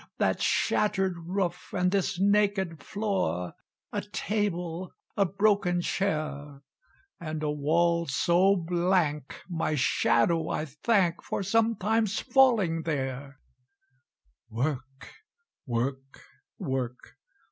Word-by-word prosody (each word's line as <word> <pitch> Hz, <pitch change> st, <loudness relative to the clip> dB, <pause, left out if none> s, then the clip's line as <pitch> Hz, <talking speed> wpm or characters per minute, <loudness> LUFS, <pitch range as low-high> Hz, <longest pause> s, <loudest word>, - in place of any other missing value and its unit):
That -, -, +1 dB
shattered 190 Hz, -3 st, +1 dB
roof 180 Hz, -2 st, -2 dB
and 180 Hz, 0 st, +2 dB
this 195 Hz, -2 st, 0 dB
naked 200 Hz, -4 st, +2 dB
floor 190 Hz, -, -2 dB, 0.4 s
A -, -, -1 dB
table 180 Hz, -4 st, -3 dB, 0.2 s
a 200 Hz, -, +3 dB
broken 195 Hz, -2 st, +2 dB
chair 150 Hz, -6 st, -2 dB, 0.6 s
And 155 Hz, -3 st, -5 dB
a 150 Hz, -, 0 dB
wall 170 Hz, +3 st, +1 dB
so 175 Hz, +8 st, +3 dB
blank, 170 Hz, -4 st, 0 dB
my 160 Hz, -3 st, -1 dB
shadow 155 Hz, +4 st, +2 dB
I 155 Hz, -, -1 dB
thank 170 Hz, -, +1 dB
For -, -, -3 dB
sometimes 220 Hz, 0 st, +1 dB
falling 220 Hz, -, +3 dB
there! 135 Hz, -3 st, -3 dB, 1.1 s
"Work 135 Hz, +2 st, -4 dB, 0.6 s
work 130 Hz, +3 st, -3 dB, 0.3 s
work! 125 Hz, -2 st, -4 dB
170 Hz, 95 wpm, -28 LUFS, 145-195 Hz, 1.1 s, a